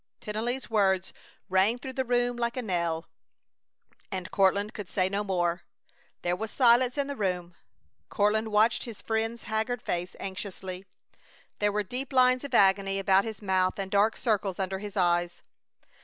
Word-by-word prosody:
Tennelly's 235 +5 -3
words 190 -4 +1 0.3
rang 190 +5 +3
through 260 +1 -7
the 260 - -1
room 245 0 +1
like 235 +1 -2
a 255 - -2
knell, 170 -5 -1 1.1
and 185 -2 -5
Courtland 200 +2 +2
could 205 -4 -7
say 185 -2 +1
no 200 +2 -1
more. 175 -3 0 0.6
There 175 0 +1
was 220 +4 -4
silence 245 +2 +4
in 280 - +1
the 280 0 -5
room. 180 -5 -2 0.6
Courtland 215 +1 +1
watched 220 +1 +2
his 230 -4 -8
friend's 225 +1 -2
haggard 220 +3 -1
face 175 +1 -3
anxiously. 190 -1 -6 0.7
There 205 0 +2
were 210 +1 0
deep 250 +7 -5
lines 255 0 +4
of 275 -3 -3
agony 195 -1 +4
about 195 +1 +3
his 220 -2 -6
mouth 185 -1 +1
and 195 -1 -4
dark 205 +2 +3
circles 205 -5 0
under 190 0 -2
his 205 0 -7
eyes. 175 -1 +1
205 Hz, 160 wpm, -28 LUFS, 190-235 Hz, 1.1 s, silence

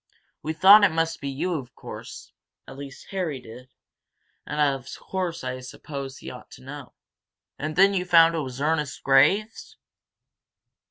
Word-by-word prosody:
We 155 +2 -3
thought 200 +5 +8
it 205 - +6
must 165 0 -1
be 140 - -3
you, 165 +7 -2
of 125 -2 -12
course - - -10 0.3
at - - -10
least 140 -1 -10
Harry 175 -8 -2
did, 125 +2 -13 0.8
and 150 - -4
of 135 -3 +1
course 180 -4 -4
I 130 0 -4
supposed 135 +1 -8
he - - -7
ought - - -12
to - - -14
know." - - -10 0.6
"And 155 +1 -4
then 195 +3 +5
you 185 -2 0
found 165 -2 +6
it 165 - -1
was 130 -3 -6
Ernest 150 -1 -1
Graves?" 150 +12 +2
150 Hz, 160 wpm, -25 LUFS, 135-175 Hz, 0.8 s, thought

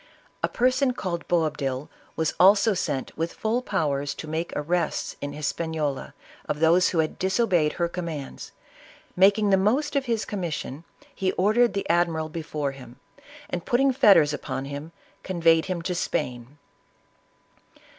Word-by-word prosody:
A - - +2
person 255 +1 +2
called 175 -7 -4
Boabdil, 150 -5 -1 0.3
was 160 -2 0
also 200 +3 +6
sent 135 -7 -3
with 165 +1 -3
full 225 +3 0
powers 145 - -1
to 155 - -8
make 160 +2 -3
arrests 170 +3 -1
in 145 0 -4
Hispaniola 150 -1 -3 0.3
of 150 - -1
those 170 +3 +4
who 175 - -3
had 160 -1 0
disobeyed 190 -5 +2
j^er 170 -1 -1
commands; 165 -6 -6 0.6
making 200 +2 +4
the 195 - +5
most 250 +11 +1
of 275 -1 +1
his 230 -3 -1
commission," 170 -5 -4 0.3
he 190 -1 -1
ordered 215 +4 +3
the 200 - -2
admiral 170 -2 +1
before 155 -3 -3
him, 130 -3 -12 0.5
and, 175 -1 -4
putting 270 +2 +2
fetters 170 - +5
upon 135 -2 -4
him, 145 +3 -7 0.3
conveyed 165 -3 +2
him 180 -3 -3
to 180 - -1
Spain. 125 -5 -3
170 Hz, 145 wpm, -25 LUFS, 150-195 Hz, 0.6 s, also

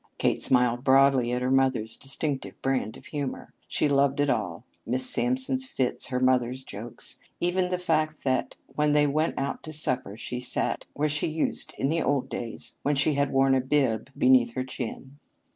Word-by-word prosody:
Kate - - +1
smiled 125 -1 +2
broadly 135 -2 +4
at 125 0 -1
her 130 - 0
mother's 130 -5 +2
distinctive 140 0 -3
brand 130 -5 -1
of - - -16
humor. 145 -3 -5
She - - +1
loved 140 0 +2
it 145 -1 +3
all - - -3 0.2
Miss 130 +2 +1
Sampson's 260 +1 +1
fits, 130 - -1
her 125 -2 -2
mother's 130 0 +1
jokes; 115 +1 -6 0.2
even 180 +1 +1
the 180 - 0
fact 155 -3 -1
that 130 -1 0
when 150 0 +1
they 150 0 +5
went 155 +3 0
out 140 0 -3
to 155 - -8
supper 130 -8 0
she 125 +1 -5
sat 125 - 0
where 150 +1 +1
she 150 0 0
used 160 0 -1
in 135 - 0
the 165 +3 0
old 140 -3 0
days 115 -2 -3
when 145 +1 +1
she 140 +2 +3
had 140 0 +1
worn 135 0 +3
a 130 - +3
bib 130 -4 +1
beneath 125 -2 +4
her 130 - -2
chin. 130 +2 -7
135 Hz, 185 wpm, -26 LUFS, 125-150 Hz, 0.2 s, they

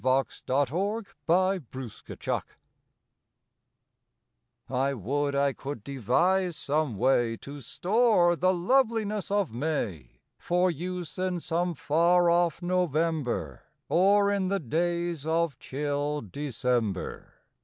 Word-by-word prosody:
May 130 +1 +3
Second 185 - -1 0.2
THE 185 +2 +3
TREASURY 130 -4 -5 2.2
T 135 +2 0
WOULD 140 +6 -1
I 140 0 +2
could 135 -6 -7
devise 170 - +1
some 145 -6 -1
way 120 -1 +2
To 140 +4 -9
store 185 - +3
the 185 +2 +3
loveliness 215 +1 +1
of 200 - 0
May 115 - -3 0.2
For 180 +1 +2
use 175 +1 -5
in 185 -1 -1
some 170 +1 -1
far 170 +4 +3
off 170 0 +1
November 155 - 0 0.3
Or 200 +3 +4
in 195 -2 0
the 195 +1 0
days 170 +1 -1
of 165 -4 0
chill 145 +1 -2
December. 120 -4 -2
160 Hz, 105 wpm, -28 LUFS, 135-180 Hz, 2.2 s, Or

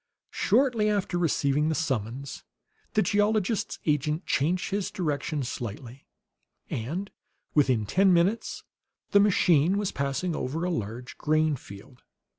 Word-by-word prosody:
Shortly 230 -1 +2
after 200 -4 -1
receiving 150 -2 +1
the 160 - 0
summons, 130 -2 -3 0.5
the 215 - +3
geologist's 205 +1 +1
agent 150 +2 0
changed 170 +6 0
his 200 -1 -1
direction 150 -5 -2
slightly; 120 +2 -7 0.6
and 165 - -3 0.4
within 130 -7 +3
ten 190 - +3
minutes 180 +6 +1 0.5
the 200 - +6
machine 180 -3 +4
was 205 -2 -1
passing 140 +5 -2
over 150 +6 -3
a 180 - 0
large 115 - -5
grain 155 0 +2
field. 110 +1 -13
155 Hz, 120 wpm, -27 LUFS, 135-195 Hz, 0.6 s, the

